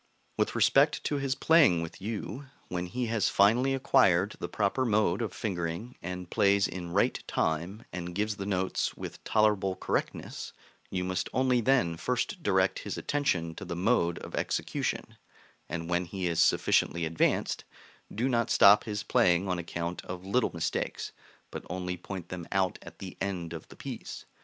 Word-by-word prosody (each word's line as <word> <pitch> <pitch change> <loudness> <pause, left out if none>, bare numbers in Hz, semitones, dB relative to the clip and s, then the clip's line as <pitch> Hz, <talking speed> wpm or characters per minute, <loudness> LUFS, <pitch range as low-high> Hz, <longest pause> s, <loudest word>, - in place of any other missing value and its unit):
With - - 0
respect 145 +2 +4
to 145 - 0
his 135 -1 -1
playing 135 - +5
with 80 - -9
you, 110 +6 -5 0.2
when 90 0 -3
he 125 +7 -2
has 115 -3 +1
finally 120 +7 +4
acquired 95 -6 +3
the - - -4
proper 105 +5 0
mode 105 -4 +2
of 115 - -2
fingering, 90 +4 -4
and 90 0 -5
plays 100 +2 +3
in 90 -2 -6
right 95 +4 +1
time, 85 +7 -1
and 90 -1 -5
gives 105 +1 -1
the 100 -1 -4
notes 95 -2 -1
with - - -8
tolerable 105 -3 +2
correctness, - - -3 0.4
you 90 -1 -2
must 90 -1 -2
only 130 -2 +3
then 115 -10 +2
first - - -2
direct - - +2
his - - -5
attention 90 - 0
to - - -8
the 85 - -5
mode 90 -2 +2
of - - -9
execution; - - -2 0.5
and 85 0 -4
when 90 +1 0
he 95 +1 -4
is 85 -2 0
sufficiently 85 -1 +3
advanced, 80 +1 0 0.5
do 120 +5 0
not 115 -3 +1
stop 100 +1 +7
his 105 -1 -3
playing 90 0 +3
on 90 -1 -1
account 85 0 -4
of 90 0 -7
little 115 +5 +2
mistakes, 85 - -3 0.4
but - - -6
only 90 0 -3
point 90 0 -7
them 90 -2 -6
out 95 -1 +1
at - - -12
the 95 -2 -8
end 90 -4 -3
of 80 - -8
the - - -14
piece. - - -7
95 Hz, 170 wpm, -29 LUFS, 85-110 Hz, 0.5 s, stop